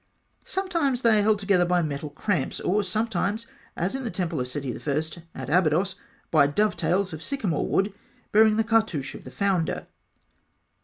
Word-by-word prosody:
Sometimes 335 -10 -1
they 225 -2 +5
are - - +4
held 210 +1 +3
together 195 -3 +3
by 175 0 +2
metal 150 0 -3
cramps, 160 0 -1
or 205 +4 +1
sometimes 210 +1 -1 0.3
as 180 +3 -1
in 270 0 -3
the 235 - -2
temple 175 -7 -2
of 125 - -2
Seti 130 -1 -4
I., 160 +2 -4
at 130 - -5
Abydos 175 +4 +2 0.4
by 145 -3 +5
dovetails 190 +1 +1
of 155 - -6
sycamore 210 - -1
wood 195 +1 +1 0.4
bearing 215 0 +6
the 225 - +3
cartouche 220 - +1
of - - -11
the - - -7
founder. 190 -3 0
185 Hz, 165 wpm, -26 LUFS, 155-215 Hz, 0.4 s, bearing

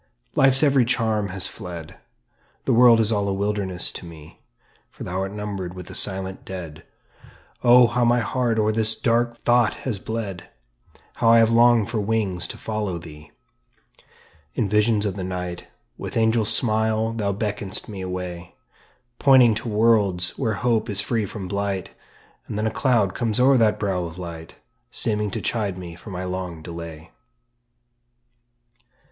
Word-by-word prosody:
Life's 135 +1 +4
every 140 -3 +4
charm 110 -4 0
has 95 0 +1
fled, 90 -7 -7 0.7
The - - +2
world 120 -1 +7
is 110 0 +2
all 100 -2 0
a 100 - 0
wilderness 100 -2 -2
to - - -8
me; 80 -3 -13 0.5
"For - - -10
thou 90 +1 -3
art 95 0 -3
numbered 100 -3 -5
with 90 -1 -8
the - - -10
silent 95 -1 -1
dead." 85 -5 -8 0.8
Oh, 125 0 +7
how 120 +1 0
my 120 +1 +3
heart 120 0 0
o'er 110 0 +2
this 110 0 +1
dark 120 0 +1
thought 120 -1 +2
has 115 -7 -2
bled! 105 -4 -5 0.7
How 115 - +3
I 115 - +7
have 115 0 +4
longed 115 -2 +4
for 115 - -1
wings 100 -4 -1
to - - -7
follow 105 -5 -3
thee! 75 -3 -12 1.3
In - - 0
visions 105 +1 +2
of 100 -1 -2
the 95 - -4
night 90 -1 -5 0.3
With - - -5
angel 110 0 +2
smile 110 0 +1
thou 105 -3 -1
beckon'st 105 -1 -2
me 100 -3 -7
away, 90 -1 -6 0.6
Pointing 130 -4 +6
to 110 +2 -4
worlds 105 -5 +2
where 115 -6 -1
hope 115 +1 0
is 100 -1 0
free 110 0 0
from 95 -1 -7
blight; 100 -1 -3 0.6
And - - -5
then 105 - -1
a 110 - 0
cloud 115 -8 +1
comes 115 -2 -1
o'er 135 +2 +5
that 110 -3 +3
brow 95 -4 -1
of 85 0 -8
light, 85 -3 -8 0.3
Seeming 105 -1 -1
to - - -4
chide 105 -5 -2
me 90 -2 -8
for 90 +5 -12
my 90 -1 -5
long 90 -3 -5
delay. 85 -1 -9
105 Hz, 165 wpm, -23 LUFS, 90-115 Hz, 1.3 s, world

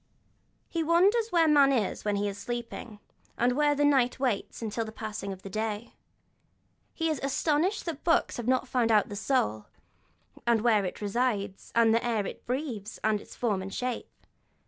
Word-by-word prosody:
He 335 - -2
wonders 380 +8 +3
where 335 -4 +4
man 285 -2 +6
is 225 -7 0
when 210 -1 0
he 205 +1 0
is 200 - -3
sleeping, 235 -1 -6 0.4
and 245 +1 +3
where 290 +3 +2
the 290 +1 +2
night 265 -4 +3
waits 250 -7 -1
until 225 +1 -2
the 220 - -7
passing 215 -2 -5
of 190 -1 -9
day. 215 +3 -4 1.0
He 325 - 0
is 300 - -2
astonished 305 +8 0
that 320 -4 -5
books 335 - +2
have 240 -1 -5
not 255 0 +2
found 235 -3 +1
out 210 -2 +4
the 205 - -6
soul, 110 - 0 0.8
and 235 -2 +4
where 215 -4 +3
it 180 - -5
resides, 205 -2 -1
and 230 -1 +5
the 230 - +2
air 225 -4 0
it - - -8
breathes, 245 -5 -3
and 215 -1 +1
its - - -13
form 210 -6 0
and 190 +1 -6
shape. 250 +3 -3
235 Hz, 180 wpm, -28 LUFS, 210-280 Hz, 1.0 s, man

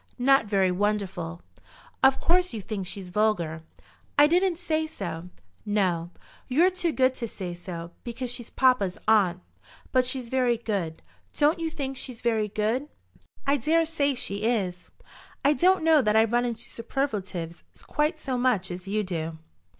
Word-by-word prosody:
"Not 270 -2 +4
very 195 -2 +2
wonderful." 185 -4 -2 0.6
"Of 265 0 +5
course 360 -5 +2
you 215 - -4
think 195 -2 -4
she's 190 -1 -7
vulgar." 175 -6 +1 0.6
"I 290 - +8
didn't 355 +2 +2
say 315 -3 -1
so." 175 - -6 0.3
"No; 185 -5 0 0.4
you're 330 +9 +4
too 355 -2 0
good 260 -3 +3
to 235 -2 -4
say 185 -5 -6
so, 175 -1 -7
because 240 +1 -4
she's 240 -2 -7
papa's 250 -8 +2
aunt. 190 -5 +4 0.5
But 255 -1 +4
she's 255 -2 -2
very 250 -2 +2
good. 195 -8 -3 0.3
Don't 305 +4 +3
you 330 -1 -1
think 275 -4 -4
she's 255 -3 -5
very 220 -3 +1
good?" 215 +7 -1 0.6
"I 280 +1 +3
dare 320 +6 +2
say 285 -4 +1
she 200 -5 -2
is. 200 -6 -1 0.6
I 285 - +6
don't 365 +2 +3
know 320 -2 +6
that 210 -3 +1
I 220 - +7
run 240 +2 +1
into 235 -2 -3
superlatives 205 - -4 0.2
quite 305 +2 0
so 260 -4 -2
much 230 -8 +1
as 180 +2 -7
you 210 +2 0
do." 165 -4 -4
230 Hz, 160 wpm, -26 LUFS, 190-275 Hz, 0.6 s, I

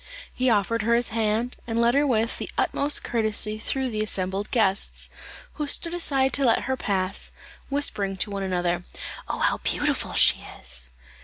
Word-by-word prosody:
He 255 0 +1
offered 225 +1 +1
her 230 +2 +2
his 240 0 +1
hand, 225 +2 -1
and 230 0 -1
led 235 +1 +4
her 285 +2 +3
with 225 -3 0
the - - -5
utmost 290 +1 +2
courtesy 215 -2 +1
through 260 +2 -1
the 215 -1 -2
assembled 195 -1 -2
guests, 200 -5 0 0.4
who 300 -1 -3
stood 335 +4 +2
aside 270 -6 +1
to 275 - +3
let 235 -3 +3
her 265 - -1
pass, 195 -5 -1 0.4
whispering 205 -9 0
to 205 - 0
one 200 0 -3
another, 175 -2 -1 0.5
"Oh, - - -2
how - - +1
beautiful - - -1
she - - +4 0.2
is!" 60 -1 -9
225 Hz, 170 wpm, -25 LUFS, 200-255 Hz, 0.5 s, led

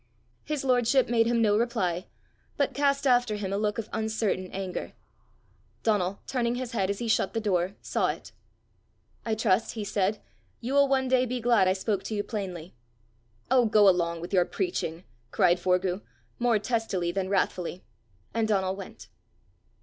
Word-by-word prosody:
His 300 -2 -3
lordship 250 0 +3
made 230 -1 +3
him 235 -1 +2
no 205 -1 +4
reply, 185 -6 0 0.5
but 280 - +1
cast 280 0 +1
after 245 -4 +3
him 195 -2 -3
a - - 0
look 210 -1 0
of 225 -2 -4
uncertain 220 -4 -1
anger. 190 -1 -5 0.9
Donal, 200 -3 0
turning 240 -2 -1
his 250 -1 -4
head 195 -5 0
as 200 - -1
he 235 - -4
shut 205 -3 +1
the - - +2
door, 190 -3 0
saw - - 0
it: - - -5 1.0
"I 220 - +1
trust," 215 -1 +1
he 220 - -3
said, 200 +1 0 0.4
"you 245 +3 -4
will 280 0 +5
one 265 -1 +1
day 255 0 +3
be 250 +1 -2
glad 235 -5 +3
I 185 - +4
spoke 195 +1 -1
to 220 - -3
you 205 - -1
plainly." 185 -7 -5 0.8
"Oh, 250 -3 +5
go 210 -1 +5
along 170 -3 +2
with 175 +3 -7
your 180 -2 +5
preaching!" 175 - -3 0.3
cried 175 +8 +3
Forgue, 180 +1 +1 0.4
more 240 -2 +3
testily 210 -5 -1
than 190 +1 -2
wrathfully; 185 -2 -1 0.5
and 225 -1 +1
Donal 190 -3 +1
went. 195 -1 -10
210 Hz, 170 wpm, -27 LUFS, 185-240 Hz, 1.0 s, will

